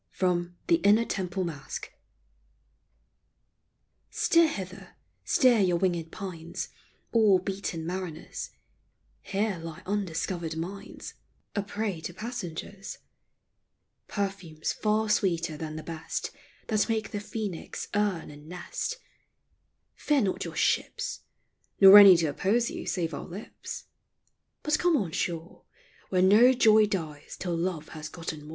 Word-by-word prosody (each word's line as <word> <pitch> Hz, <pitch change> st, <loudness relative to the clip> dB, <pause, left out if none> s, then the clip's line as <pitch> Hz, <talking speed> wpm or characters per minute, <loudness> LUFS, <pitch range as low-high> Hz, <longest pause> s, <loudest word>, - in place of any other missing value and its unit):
FROM 175 Hz, -1 st, -1 dB
THE 335 Hz, -, +4 dB
" -, -, -15 dB
INNER 215 Hz, +3 st, +5 dB
TEMPLE 185 Hz, -2 st, -2 dB
MASQUE." 155 Hz, -5 st, -6 dB, 2.2 s
Steer 335 Hz, -1 st, +4 dB
hither, 195 Hz, -, -7 dB, 0.3 s
steer 250 Hz, -4 st, +4 dB
your 180 Hz, -3 st, +3 dB
winged 170 Hz, -3 st, 0 dB
pines, 170 Hz, -5 st, -6 dB, 0.4 s
All 215 Hz, -4 st, +5 dB
beaten 185 Hz, -3 st, -4 dB
mariners: 180 Hz, -2 st, -5 dB, 0.7 s
Here 200 Hz, -2 st, -1 dB
lie 165 Hz, -1 st, -8 dB
undiscovered 175 Hz, -4 st, -2 dB
mines, 185 Hz, +5 st, -6 dB, 0.4 s
A 205 Hz, -, +1 dB
prey 200 Hz, -3 st, -3 dB
to 170 Hz, +2 st, -6 dB
passengers; 200 Hz, -3 st, -6 dB, 1.1 s
Perfumes 195 Hz, -6 st, -3 dB
far 215 Hz, 0 st, +1 dB
sweeter 170 Hz, -6 st, +1 dB
than 155 Hz, 0 st, -5 dB
the 155 Hz, -, -6 dB
best 165 Hz, -1 st, -4 dB, 0.3 s
That 215 Hz, 0 st, +1 dB
make 220 Hz, -1 st, -1 dB
the 205 Hz, -, -2 dB
phoenix 205 Hz, -4 st, -5 dB
urn 205 Hz, -7 st, 0 dB
and 150 Hz, +1 st, -13 dB
nest: 180 Hz, -, -4 dB, 1.0 s
Fear 295 Hz, -3 st, +1 dB
not 195 Hz, -4 st, 0 dB
your -, -, -6 dB
ships, -, -, 0 dB, 0.6 s
Nor 195 Hz, +1 st, +11 dB
any 195 Hz, -3 st, +10 dB
to 165 Hz, -, +1 dB
oppose 200 Hz, +10 st, +1 dB
you -, -, -6 dB
save 165 Hz, -4 st, -1 dB
our -, -, -6 dB
lips; 190 Hz, +5 st, -8 dB, 0.8 s
But 300 Hz, 0 st, +2 dB
come 350 Hz, -3 st, +3 dB
on 190 Hz, -, -2 dB
shore, 170 Hz, +1 st, -4 dB, 0.4 s
Where 185 Hz, -1 st, +3 dB
no 220 Hz, +7 st, +7 dB
joy 220 Hz, -3 st, +6 dB
dies 155 Hz, -7 st, -5 dB
till 175 Hz, -2 st, -2 dB
love 165 Hz, -2 st, -2 dB
has 155 Hz, -1 st, -7 dB
gotten 160 Hz, -3 st, -6 dB
more. 150 Hz, -, -11 dB
185 Hz, 130 wpm, -28 LUFS, 165-210 Hz, 2.2 s, Nor